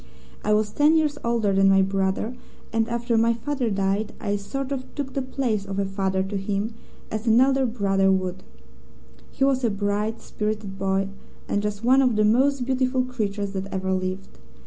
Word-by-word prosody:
I 210 Hz, -, 0 dB
was 210 Hz, 0 st, 0 dB
ten 300 Hz, +2 st, +4 dB
years 300 Hz, -2 st, +1 dB
older 230 Hz, -4 st, +1 dB
than 195 Hz, 0 st, +5 dB
my 195 Hz, 0 st, +5 dB
brother, 195 Hz, +4 st, -1 dB, 0.4 s
and 225 Hz, 0 st, +1 dB
after 235 Hz, -1 st, +1 dB
my 230 Hz, +1 st, +3 dB
father 255 Hz, 0 st, -2 dB
died 195 Hz, +1 st, 0 dB
I 205 Hz, -2 st, -1 dB
sort 270 Hz, +7 st, -4 dB
of 260 Hz, -2 st, -5 dB
took 280 Hz, -2 st, -4 dB
the 275 Hz, -, -1 dB
place 255 Hz, -5 st, -1 dB
of 195 Hz, -1 st, -5 dB
a 200 Hz, -, +1 dB
father 190 Hz, -1 st, -1 dB
to 195 Hz, +1 st, -3 dB
him, 200 Hz, +3 st, -2 dB, 0.4 s
as 220 Hz, +2 st, -4 dB
an 225 Hz, +1 st, +6 dB
elder 265 Hz, 0 st, +4 dB
brother 195 Hz, -4 st, +2 dB
would. 185 Hz, -1 st, -1 dB, 0.9 s
He 270 Hz, -, -2 dB
was 270 Hz, -1 st, +2 dB
a 235 Hz, -, +3 dB
bright, 205 Hz, +2 st, -1 dB
spirited 210 Hz, -2 st, -4 dB
boy, 195 Hz, 0 st, 0 dB, 0.4 s
and 205 Hz, -, 0 dB
just 210 Hz, +1 st, -3 dB
one 260 Hz, +3 st, +5 dB
of 250 Hz, -4 st, +2 dB
the 215 Hz, 0 st, +3 dB
most 260 Hz, +4 st, +3 dB
beautiful 255 Hz, 0 st, +1 dB
creatures 205 Hz, -5 st, -3 dB
that 195 Hz, 0 st, -5 dB
ever 190 Hz, 0 st, -1 dB
lived. 185 Hz, +1 st, -4 dB
215 Hz, 190 wpm, -24 LUFS, 195-255 Hz, 0.9 s, an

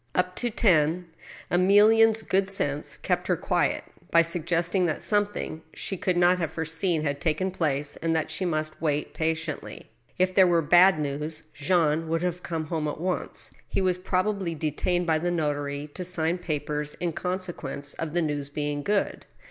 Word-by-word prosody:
Up 180 Hz, 0 st, +1 dB
to 240 Hz, -, 0 dB
ten, 175 Hz, -5 st, +2 dB, 0.4 s
Emilienne's 215 Hz, +5 st, +5 dB
good 195 Hz, 0 st, +1 dB
sense 145 Hz, -6 st, 0 dB
kept -, -, -1 dB
her -, -, +2 dB
quiet, -, -, 0 dB, 0.3 s
by 170 Hz, 0 st, +5 dB
suggesting 175 Hz, +2 st, 0 dB
that 155 Hz, -, -2 dB
something 205 Hz, -6 st, -1 dB
she 195 Hz, -, -3 dB
could 180 Hz, -1 st, 0 dB
not 175 Hz, +1 st, +4 dB
have 165 Hz, -3 st, -2 dB
foreseen 160 Hz, 0 st, -1 dB
had 140 Hz, -1 st, -2 dB
taken 170 Hz, +4 st, 0 dB
place, 150 Hz, -5 st, -1 dB
and 165 Hz, 0 st, 0 dB
that 160 Hz, -, -1 dB
she -, -, -2 dB
must 155 Hz, -3 st, -2 dB
wait 150 Hz, -2 st, -1 dB
patiently. 160 Hz, -1 st, -3 dB, 0.3 s
If 185 Hz, 0 st, +2 dB
there 190 Hz, -1 st, +6 dB
were 170 Hz, -2 st, +3 dB
bad 175 Hz, +2 st, +6 dB
news, 150 Hz, +2 st, -4 dB
Jean 160 Hz, +1 st, +1 dB
would 165 Hz, +1 st, -1 dB
have 180 Hz, 0 st, -2 dB
come 165 Hz, -3 st, -3 dB
home 155 Hz, -1 st, -2 dB
at 150 Hz, -, -4 dB
once. 180 Hz, +2 st, -2 dB, 0.2 s
He -, -, -1 dB
was 185 Hz, -1 st, +1 dB
probably 185 Hz, -1 st, -1 dB
detained 170 Hz, +3 st, -1 dB
by 160 Hz, -2 st, +2 dB
the 175 Hz, +2 st, -1 dB
notary 145 Hz, -3 st, -2 dB
to 185 Hz, -, -5 dB
sign 175 Hz, -1 st, -1 dB
papers 150 Hz, -2 st, -3 dB
in 175 Hz, -2 st, -1 dB
conse 180 Hz, +1 st, -3 dB
quence 140 Hz, -1 st, -3 dB
of 160 Hz, -2 st, -3 dB
the 175 Hz, -1 st, +1 dB
news 145 Hz, -2 st, -2 dB
being 145 Hz, 0 st, -2 dB
good. 200 Hz, +5 st, -1 dB
165 Hz, 175 wpm, -26 LUFS, 150-180 Hz, 0.4 s, there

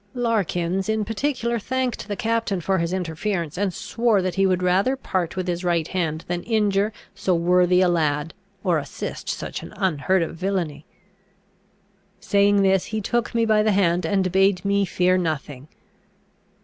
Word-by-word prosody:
"[F] 200 Hz, -, -39 dB
Larkins 195 Hz, -5 st, 0 dB
in 220 Hz, -1 st, 0 dB
particular 235 Hz, +1 st, -1 dB
thanked 255 Hz, +2 st, -2 dB
the 205 Hz, -, -3 dB
captain 230 Hz, -3 st, -1 dB
for 190 Hz, +2 st, 0 dB
his 170 Hz, 0 st, -1 dB
interference, 175 Hz, -2 st, -2 dB
and 195 Hz, +1 st, 0 dB
swore 225 Hz, +2 st, 0 dB
that 185 Hz, -1 st, -1 dB
he 195 Hz, 0 st, +2 dB
would 185 Hz, -1 st, +1 dB
rather 195 Hz, +9 st, +2 dB
part 185 Hz, -10 st, -2 dB
with 185 Hz, -1 st, -3 dB
his 175 Hz, 0 st, -2 dB
right 170 Hz, -2 st, +1 dB
hand 165 Hz, -4 st, -2 dB
than 175 Hz, 0 st, -2 dB
injure 210 Hz, -1 st, +1 dB, 0.2 s
so 185 Hz, -, 0 dB
worthy 180 Hz, +1 st, +3 dB
a 185 Hz, -, +4 dB
lad 155 Hz, -2 st, 0 dB, 0.3 s
or 175 Hz, -5 st, +2 dB
assist 140 Hz, -1 st, -6 dB
such -, -, -4 dB
an -, -, -10 dB
unheard 185 Hz, +1 st, +1 dB
of 165 Hz, -, -5 dB
villainy. 170 Hz, -5 st, -3 dB, 1.3 s
Saying 200 Hz, 0 st, +3 dB
this, 190 Hz, -1 st, +3 dB
he 220 Hz, -, -3 dB
took 235 Hz, +3 st, -1 dB
me 230 Hz, -1 st, +3 dB
by 215 Hz, -1 st, +3 dB
the 215 Hz, -1 st, +2 dB
hand 180 Hz, -2 st, +2 dB
and 185 Hz, +2 st, +1 dB
bade 195 Hz, 0 st, +2 dB
me 200 Hz, 0 st, +2 dB
fear 185 Hz, 0 st, +2 dB
nothing. 150 Hz, -5 st, -4 dB
190 Hz, 170 wpm, -23 LUFS, 175-210 Hz, 1.3 s, a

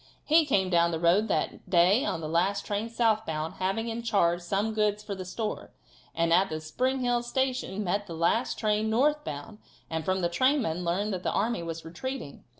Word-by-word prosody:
He 315 Hz, 0 st, +4 dB
came 190 Hz, -8 st, +2 dB
down 170 Hz, -1 st, +4 dB
the 165 Hz, -1 st, -2 dB
road 175 Hz, +6 st, +3 dB
that -, -, -2 dB
day 185 Hz, +8 st, +4 dB
on 165 Hz, -, -2 dB
the 155 Hz, -, -4 dB
last 185 Hz, +5 st, 0 dB
train 210 Hz, +2 st, -2 dB
southbound, 215 Hz, -10 st, 0 dB
having 195 Hz, +5 st, -1 dB
in 230 Hz, 0 st, -3 dB
charge 175 Hz, -7 st, +2 dB
some 200 Hz, +5 st, -1 dB
goods 210 Hz, -1 st, 0 dB
for 205 Hz, -, -5 dB
the 190 Hz, -1 st, -6 dB
store, 215 Hz, +4 st, -4 dB, 0.5 s
and 165 Hz, 0 st, +2 dB
at 190 Hz, +3 st, +4 dB
the 155 Hz, -, -3 dB
Spring 255 Hz, +12 st, -1 dB
Hill 245 Hz, -1 st, +1 dB
station 250 Hz, -4 st, -1 dB
met 200 Hz, +2 st, -1 dB
the 165 Hz, -, -6 dB
last 170 Hz, +9 st, +1 dB
train 215 Hz, 0 st, +1 dB
northbound, 225 Hz, -, -1 dB, 0.3 s
and 160 Hz, 0 st, -2 dB
from 185 Hz, +3 st, 0 dB
the 175 Hz, -, +2 dB
trainmen 220 Hz, -, +1 dB
learned 195 Hz, +5 st, -1 dB
that 185 Hz, -, -3 dB
the -, -, -1 dB
army 220 Hz, -2 st, 0 dB
was 165 Hz, -1 st, -6 dB
retreating. 205 Hz, -, -6 dB
200 Hz, 195 wpm, -28 LUFS, 170-230 Hz, 0.5 s, He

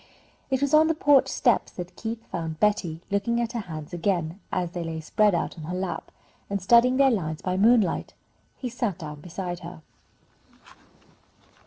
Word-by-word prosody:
It 265 Hz, -1 st, 0 dB
was 280 Hz, 0 st, 0 dB
on 310 Hz, +1 st, +7 dB
the 325 Hz, -, +1 dB
porch 290 Hz, -3 st, +5 dB
steps -, -, +1 dB
that 180 Hz, 0 st, -7 dB
Keith 225 Hz, +2 st, -5 dB
found 165 Hz, -2 st, -4 dB
Betty 185 Hz, -6 st, +1 dB
looking 205 Hz, +4 st, +1 dB
at 235 Hz, -1 st, -1 dB
her 240 Hz, -, -3 dB
hands 160 Hz, -6 st, -7 dB
again, 175 Hz, -1 st, -1 dB
as 175 Hz, -2 st, -1 dB
they 175 Hz, -1 st, -4 dB
lay 165 Hz, -1 st, -4 dB
spread 205 Hz, +5 st, +2 dB
out 170 Hz, -, -2 dB
on 155 Hz, -, -7 dB
her 180 Hz, +3 st, -3 dB
lap, 180 Hz, -3 st, -4 dB, 0.4 s
and 200 Hz, 0 st, -1 dB
studying 235 Hz, +6 st, +5 dB
their 270 Hz, -1 st, +5 dB
lines 160 Hz, -8 st, -2 dB
by 185 Hz, 0 st, -1 dB
moonlight. 215 Hz, -1 st, +3 dB, 0.4 s
He 255 Hz, -, -4 dB
sat 235 Hz, -6 st, -2 dB
down 150 Hz, -4 st, -8 dB
beside 175 Hz, +1 st, -5 dB
her. 170 Hz, -2 st, -10 dB
185 Hz, 175 wpm, -26 LUFS, 170-235 Hz, 0.4 s, on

